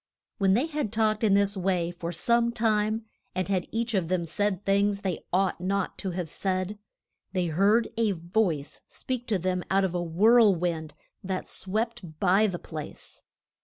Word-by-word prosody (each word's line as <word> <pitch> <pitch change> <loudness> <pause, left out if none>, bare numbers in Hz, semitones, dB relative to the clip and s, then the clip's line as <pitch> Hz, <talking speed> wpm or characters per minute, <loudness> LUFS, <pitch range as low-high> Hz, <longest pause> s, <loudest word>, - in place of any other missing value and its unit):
When 195 -1 +4
they 250 +7 +2
had 300 -9 -3
talked 215 -1 +1
in 205 -3 +4
this 200 0 +2
way 180 -2 0
for 170 -1 -5
some 235 +6 +2
time, 220 -1 +1 0.3
and 185 0 -1
had 190 -3 0
each 230 +1 -1
of 185 -5 +1
them 180 -1 0
said 205 +3 -1
things 200 0 +2
they 185 -4 -3
ought 185 -1 +1
not 195 +1 -1
to 195 - -2
have 180 -1 -3
said, 185 +4 -2 0.5
they 180 -2 +1
heard 200 +8 +3
a 225 -3 +2
voice 170 -4 -1
speak 250 -2 -5
to 215 - +1
them 180 0 -1
out 195 +1 +3
of 185 -2 0
a 175 - -1
whirl 205 +5 +5
wind 160 -3 -3 0.3
that 190 -1 -3
swept 195 -5 -3
by 195 +3 +4
the 185 -3 -3
place. 155 -3 -8
195 Hz, 175 wpm, -27 LUFS, 180-215 Hz, 0.5 s, whirl